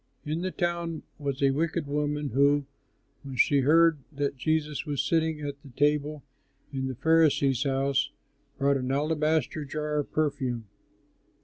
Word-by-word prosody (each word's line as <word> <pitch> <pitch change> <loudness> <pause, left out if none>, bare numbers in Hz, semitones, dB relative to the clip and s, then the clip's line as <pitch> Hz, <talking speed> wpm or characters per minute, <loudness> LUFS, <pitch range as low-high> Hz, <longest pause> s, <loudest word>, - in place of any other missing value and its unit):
In 155 +3 -2
the 185 - -1
town 170 -3 -2 0.2
was 140 -1 -2
a 135 - +5
wicked 160 +2 -1
woman 145 0 -1
who, 140 +3 +3 0.6
when 135 -2 -8
she 140 +2 +4
heard 160 +3 +5
that 145 -1 -2
Jesus 150 +2 -1
was 145 -4 -3
sitting 160 +1 +1
at 145 -1 -5
the 140 - -13
table 145 +2 0 0.5
in 130 -1 -2
the 130 - -4
Pharisee's 145 -2 +3
house, 135 0 +1 0.5
brought 140 0 +2
an 130 0 -2
alabaster 155 +1 0
jar 150 +1 -2
of 145 - -4
perfume. 135 -6 -1
145 Hz, 145 wpm, -28 LUFS, 140-155 Hz, 0.6 s, a